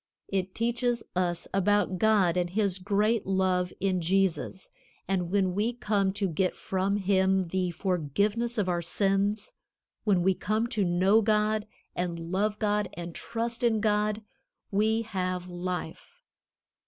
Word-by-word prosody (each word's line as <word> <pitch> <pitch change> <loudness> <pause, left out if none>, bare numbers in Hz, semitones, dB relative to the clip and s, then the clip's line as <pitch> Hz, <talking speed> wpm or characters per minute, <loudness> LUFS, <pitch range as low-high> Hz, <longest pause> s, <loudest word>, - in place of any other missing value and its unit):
It 190 -1 -2
teaches 235 +1 0
us 175 -2 -1
about 195 -1 +2
God 205 -6 +3
and 175 -1 0
his 195 -1 0
great 210 +3 +1
love 185 -1 +1
in 185 -2 0
Jesus, 185 +1 0 0.4
and 180 -3 0
when 190 -1 +1
we 215 +5 0
come 205 -5 0
to 200 0 0
get 180 +2 0
from 190 +1 -1
Him 190 -2 +2
the 185 0 0
forgiveness 200 - -1
of 205 -3 +1
our 175 -1 0
sins, 200 - 0 0.5
when 190 -5 +2
we 190 +1 +4
come 215 +4 -1
to 210 -3 0
know 185 +5 +4
God 215 0 +1 0.3
and 170 -1 -3
love 205 +3 0
God 210 -1 0
and 170 0 -6
trust 235 +3 -3
in 225 -2 +3
God, 210 0 +1 0.5
we 220 +3 +2
have 185 -4 -3
life. 175 -2 -6
195 Hz, 140 wpm, -28 LUFS, 180-215 Hz, 0.5 s, we